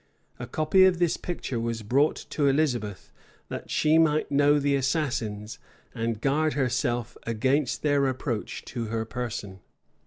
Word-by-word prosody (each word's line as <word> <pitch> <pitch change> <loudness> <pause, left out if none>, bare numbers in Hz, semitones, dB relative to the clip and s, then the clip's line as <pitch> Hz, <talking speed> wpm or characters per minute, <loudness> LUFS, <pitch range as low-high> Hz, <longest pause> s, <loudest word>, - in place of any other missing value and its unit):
A - - -5
copy 170 +5 +4
of 185 -2 +3
this 170 -1 +2
picture 150 -8 -4
was 115 -1 -3
brought 140 +8 +2 0.2
to 145 -2 +1
Elizabeth, 125 -9 0 0.4
that - - -6
she 155 +1 +3
might 155 -2 +2
know 145 +1 +4
the 145 0 +1
assassins, 120 -7 -2 0.3
and 115 -2 -2
guard 150 +4 +1
herself 120 -3 -1
against 130 +5 0
their 145 -2 +3
approach 125 -4 -3
to 120 -2 -4
her 110 0 -2
person. 110 -4 -5
130 Hz, 145 wpm, -26 LUFS, 115-150 Hz, 0.4 s, copy